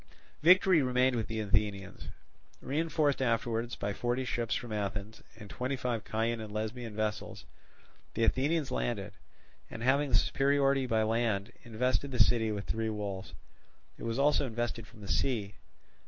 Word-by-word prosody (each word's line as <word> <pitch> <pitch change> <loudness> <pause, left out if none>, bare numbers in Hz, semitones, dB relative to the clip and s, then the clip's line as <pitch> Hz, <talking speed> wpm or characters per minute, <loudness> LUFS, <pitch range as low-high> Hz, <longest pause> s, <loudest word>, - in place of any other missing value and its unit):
Victory 180 0 +6
remained 125 0 +2
with 110 -2 -1
the 110 0 -3
Athenians. 100 -2 -1 0.5
Reinforced 150 -1 0
afterwards 115 -1 0
by 100 0 -3
forty 120 +4 -1
ships 120 -2 -1
from 120 -3 -4
Athens, 105 +1 -4 0.2
and 105 - -10
twenty 125 +6 -3
five 125 -4 -2
Chian 115 +1 -1
and 110 -1 -7
Lesbian 110 +1 -4
vessels, 110 -1 -3 0.7
the 115 - +1
Athenians 145 +5 +1
landed, 105 -4 -2 0.6
and 115 - -7
having 140 +3 +3
the - - +2
superiority 135 -1 +2
by 110 -2 +2
land 110 -3 0
invested 125 +4 -1
the 130 - -4
city 110 -1 +4
with 105 -1 -4
three 110 0 -1
walls; 100 -3 -5 0.6
it - - -12
was 115 0 -2
also 140 0 +3
invested 115 -1 -3
from 110 -4 -16
the 100 - -8
sea. 105 -4 0
115 Hz, 155 wpm, -31 LUFS, 110-130 Hz, 0.7 s, Victory